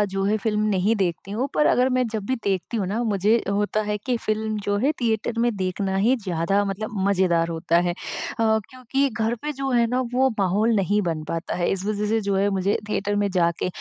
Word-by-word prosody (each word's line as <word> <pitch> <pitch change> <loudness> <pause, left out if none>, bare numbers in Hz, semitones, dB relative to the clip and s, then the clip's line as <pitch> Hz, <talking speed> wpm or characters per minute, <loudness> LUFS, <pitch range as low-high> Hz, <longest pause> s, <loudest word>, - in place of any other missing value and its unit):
जो 195 - 0
है 210 +2 +2
फ़िल्म 210 0 -1
नहीं 200 +3 +2
देखती 190 -1 -2
हूँ 240 +6 -1
पर 300 - +3
अगर 255 +1 +3
मैं 255 - +2
जब 220 -3 -4
भी 260 - 0
देखती 195 +3 -1
हुँ 195 -4 -1
ना, 215 +5 -1
मुझे 215 +1 +2
होता 205 +1 0
है 210 0 -1
कि 245 +4 -2
फ़िल्म 215 0 -1
जो 205 0 +1
है 270 +8 +2
थिएटर 230 0 0
में 240 0 +3
देखना 190 0 -2
ही 225 +7 +3
ज़्यादा 185 +2 +1
मतलब 200 +2 -3 0.2
मज़ेदार 180 -4 +2
होता 170 0 +1
है। - - +1
अ, - - -4 0.8
क्योंकि 260 +2 -1
घर 225 0 -1
पे 300 - -2
जो 275 -1 -3
है 240 -1 +4
ना, 250 +2 0
वो 265 +1 +3
माहौल 205 +4 +2
नहीं 205 +1 +2
बन 165 -4 -2
पाता 165 0 -3
है, 175 -1 0
इस 195 0 -2
वजह 210 0 -1
से 225 +1 +2
जो 200 -1 -1
है 200 +1 +2
मुझे 195 0 +1
थिएटर 205 0 -1
में 205 0 +1
जाके 170 -1 +1
205 Hz, 225 wpm, -23 LUFS, 190-230 Hz, 0.8 s, है